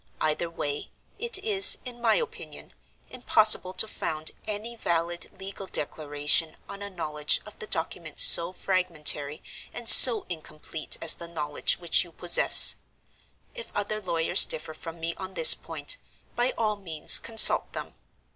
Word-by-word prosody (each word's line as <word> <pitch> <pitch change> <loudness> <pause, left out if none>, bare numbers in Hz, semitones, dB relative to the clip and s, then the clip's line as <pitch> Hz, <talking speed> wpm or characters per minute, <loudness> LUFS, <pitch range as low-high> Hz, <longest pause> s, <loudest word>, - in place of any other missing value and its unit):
Either 155 +2 -4
way, 145 -3 -8 0.3
it 470 -2 -4
is, 395 -1 +4
in 240 -1 -11
my 230 -2 0
opinion, 470 0 -9 0.4
impossible 220 -6 0
to 190 +4 0
found 155 -6 -5 0.2
any 215 +3 -7
valid 170 -4 -5
legal 195 0 -10
declaration 150 +1 -2
on 200 0 -12
a 200 - -8
knowledge 150 -5 -3
of 210 - -16
the 215 - -10
document 160 -2 -6
so 170 +1 +6
fragmentary 160 -6 -1 0.3
and 240 - -12
so 230 -3 +8
incomplete 155 -2 -6
as 165 - +4
the 170 - -10
knowledge 150 -3 -2
which 170 +1 0
you 175 - -17
possess. 175 +1 +5 0.8
If 475 -1 -12
other 205 +1 -6
lawyers 165 -4 +1
differ 160 0 -5
from 165 +1 -13
me 165 +1 -6
on 190 0 -11
this 480 - +8
point, - - -4 0.4
by 245 +1 -3
all 215 -2 -4
means 165 -6 +2
consult 225 -1 +2
them. - - -9
175 Hz, 145 wpm, -23 LUFS, 160-215 Hz, 0.8 s, so